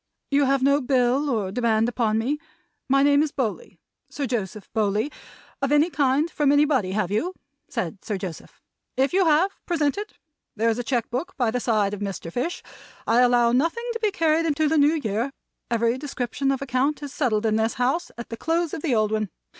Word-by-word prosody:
"You 280 0 +4
have 270 0 +2
no 280 +1 +4
bill 260 +2 +2
or 210 -7 -1
demand 225 0 +2
upon 225 -3 0
me 265 +7 -1 0.5
my 275 +1 +4
name 285 0 +5
is 305 -1 0
Bowley, 265 - -3 0.3
Sir 285 - -3
Joseph 215 -5 -4
Bowley 215 +4 0 0.5
of 275 0 0
any 295 +4 +4
kind 285 +1 +2
from 290 -2 +2
anybody, 285 -10 +2
have 200 -3 -1
you?" 340 - -1 0.3
said 195 - -4
Sir 210 -3 -2
Joseph. 185 -4 -8 0.4
"If 270 +5 +2
you 380 0 +4
have, 325 +5 +4 0.2
present 310 -1 +1
it. 420 +1 -7 0.4
There 225 +1 +2
is 225 - -3
a - - -2
cheque 235 -1 -1
book 255 +8 -4
by 240 -5 +1
the 250 - -1
side 215 -4 +1
of 205 - -4
Mr. 195 -4 -5
Fish. 300 +9 -3 0.4
I 230 +2 +3
allow 240 -1 +4
nothing 330 - 0
to 460 - -4
be 435 -2 +2
carried 330 -3 +1
into 310 0 +1
the 315 +1 +2
New 295 +3 +4
Year. 235 -2 -2 0.4
Every 235 +1 +1
description 270 -1 -2
of 275 0 -2
account 275 +3 0
is 285 -1 -6
settled 230 -6 0
in 215 -1 +2
this 220 +1 0
house 260 +8 0
at 235 - -7
the 230 - -6
close 330 +2 -1
of 320 - -4
the 290 -7 +1
old 215 -1 +2
one. 215 -2 -1
255 Hz, 205 wpm, -24 LUFS, 225-295 Hz, 0.5 s, name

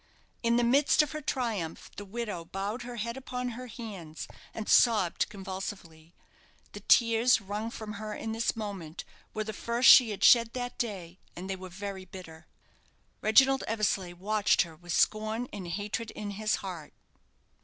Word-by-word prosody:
In 235 0 +2
the 240 - +3
midst 275 +5 +4
of 300 - -5
her 305 - -5
triumph 225 - -3
the 205 - -7
widow 205 -4 -4
bowed 200 +7 -4
her 245 0 -7
head 235 +2 -4
upon 250 -1 -4
her 250 +2 -7
hands, 200 -10 -8 0.2
and 220 - -6
sobbed 215 -8 +4
convulsively. 190 -4 -7 0.6
The - - -8
tears 230 +1 +4
wrung 210 +2 -4
from 220 -2 -7
her 215 -1 -5
in 225 - -4
this 225 +2 0
moment 195 -7 -6 0.3
were 215 - -1
the 220 0 -5
first 235 +4 +1
she 250 -4 +9
had 205 - -4
shed 230 -1 +6
that 245 -1 -5
day, 190 -6 -4 0.2
and 180 +2 -7
they 195 - -2
were 185 0 -9
very 195 +1 -6
bitter. 175 -3 -11 0.7
Reginald 270 +5 +5
Eversleigh 205 -5 0
watched 205 +3 +2
her 165 -2 -11
with 175 +2 -9
scorn 220 +6 +1
and 195 -4 -6
hatred 210 +5 -3
in 205 -1 -6
his 215 +1 0
heart. 170 -5 -7
210 Hz, 165 wpm, -29 LUFS, 190-235 Hz, 0.7 s, she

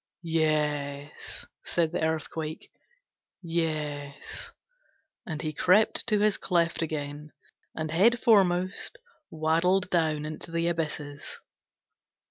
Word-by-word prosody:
'Yes,' 150 -3 -1 0.2
said 165 -2 +1
the - - -2
Earthquake, 160 0 -3 0.7
'Yes,' 150 -4 -3 0.8
and 155 -1 -4
he 155 -1 -2
crept 185 +8 +3
to 210 -2 +3
his 210 0 +3
cleft 170 -2 +1
again, 150 -1 -4 0.4
and 155 -1 -3
head 215 +9 +5
foremost 185 - +3 0.3
waddled 165 +4 +2
down 155 -3 +1
into 155 +2 -6
the 170 0 0
abysses. 150 -3 -3
160 Hz, 95 wpm, -28 LUFS, 150-175 Hz, 0.8 s, head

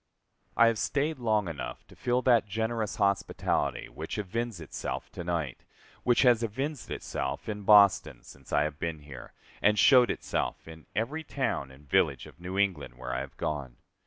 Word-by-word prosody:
I 115 - +7
have 115 -2 +2
staid 150 +1 0
long 110 -4 +1
enough 80 -4 -6
to - - -17
feel 125 +1 0
that 120 -4 +4
generous 110 +1 -2
hospitality 100 -2 0
which - - -6
evinces 110 +1 -3
itself 80 - -5
to - - -6
night, 85 -7 -3 0.4
which 120 +1 +3
has 120 -3 +5
evinced 130 +2 -3
itself 65 - -4
in 105 -1 -4
Boston 95 - +5
since 70 +1 -15
I 75 - +3
have 75 -1 -4
been 80 -2 -3
here, 70 -4 -11 0.3
and 105 +1 +4
showed 125 +1 +7
itself - - -2
in 80 -1 -12
every 140 +9 -1
town 130 - -2
and 70 +2 -17
village - - +2
of - - -15
New 90 +2 -5
England 90 -11 0
where 65 0 -5
I 60 - -1
have - - -8
gone. 70 -5 -3
100 Hz, 175 wpm, -29 LUFS, 75-115 Hz, 0.4 s, I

